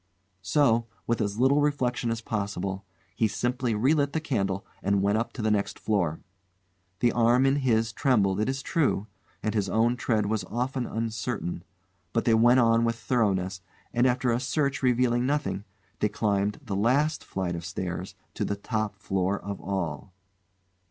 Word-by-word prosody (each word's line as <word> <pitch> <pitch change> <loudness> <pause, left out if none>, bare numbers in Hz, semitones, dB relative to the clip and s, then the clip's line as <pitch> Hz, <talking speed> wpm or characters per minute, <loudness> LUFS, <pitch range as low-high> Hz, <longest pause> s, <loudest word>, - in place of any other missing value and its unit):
So, 115 +3 +2 0.2
with 115 -1 0
as 100 0 -1
little 135 +4 +4
reflection 125 -5 0
as 115 0 -2
possible, 100 -3 -3 0.3
he 110 - +2
simply 120 +3 -1
relit 140 +5 +2
the 160 - +1
candle 100 - -1 0.2
and 100 0 +1
went 100 +2 +2
up 115 - -2
to 115 - -5
the 110 - +2
next 100 -1 0
floor. 90 -7 0 0.8
The 120 - +4
arm 120 +2 +4
in 135 +1 +3
his 115 -5 +1
trembled, 105 -8 +2
it 110 - +1
is 135 0 -3
true, 140 - +1 0.4
and 110 - 0
his 100 -3 0
own 115 +2 +2
tread 110 -4 +1
was 105 -1 -1
often 125 +4 -2
uncertain, 110 -5 -3 0.5
but 115 - +1
they 115 - +4
went 120 +3 +6
on 115 -1 +4
with 115 0 +1
thoroughness, 95 -7 0 0.3
and 120 +2 +3
after 125 0 +1
a 115 - +1
search 140 +1 0
revealing 125 -1 +2
nothing 145 -8 -1 0.3
they 105 - +2
climbed 105 +1 0
the 105 -7 -4
last 135 +9 +2
flight 90 -2 -3
of 85 - -5
stairs 90 +2 -5 0.2
to - - -2
the 100 - -1
top 110 0 -2
floor 95 -1 -1
of 100 0 -6
all. 95 -2 -3
115 Hz, 170 wpm, -27 LUFS, 100-125 Hz, 0.8 s, went